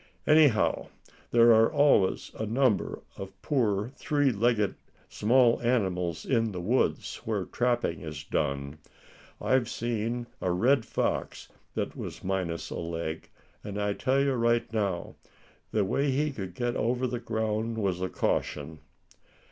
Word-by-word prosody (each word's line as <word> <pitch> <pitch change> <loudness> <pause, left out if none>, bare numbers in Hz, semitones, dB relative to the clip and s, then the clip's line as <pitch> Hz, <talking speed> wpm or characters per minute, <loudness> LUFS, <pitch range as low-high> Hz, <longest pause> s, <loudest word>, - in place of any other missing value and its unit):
Anyhow, 150 -7 +4 0.4
there 120 0 +6
are 115 +3 +5
always 145 -11 +3
a 110 - -4
number 115 -4 +1
of 95 0 -9
poor 110 -6 +1
three 145 0 +1
legged 110 -2 +1 0.4
small 120 +2 +3
animals 90 -9 0
in 115 -4 +1
the 90 - -4
woods 115 +9 0
where - - -3
trapping 120 -4 0
is 75 -3 -6
done. 70 0 -2 0.6
I've 130 -3 +1
seen 120 +1 -2 0.2
a 90 - 0
red 115 +8 +2
fox - - -2 0.3
that - - -2
was - - -7
minus 90 -3 -2
a - - -4
leg; 80 -1 -4 0.3
and 105 -1 -5
I 105 0 0
tell 130 +6 +1
you 140 -1 +2
right 120 -1 +1
now, 100 -5 -2 0.5
the 105 -2 +1
way 140 +8 +1
he 145 +3 +1
could 95 -8 -7
get 120 +1 -1
over 125 +2 0
ground 110 0 -2
was 95 -4 -1
a 95 - -1
caution." 75 -1 -2
110 Hz, 140 wpm, -28 LUFS, 95-125 Hz, 0.6 s, there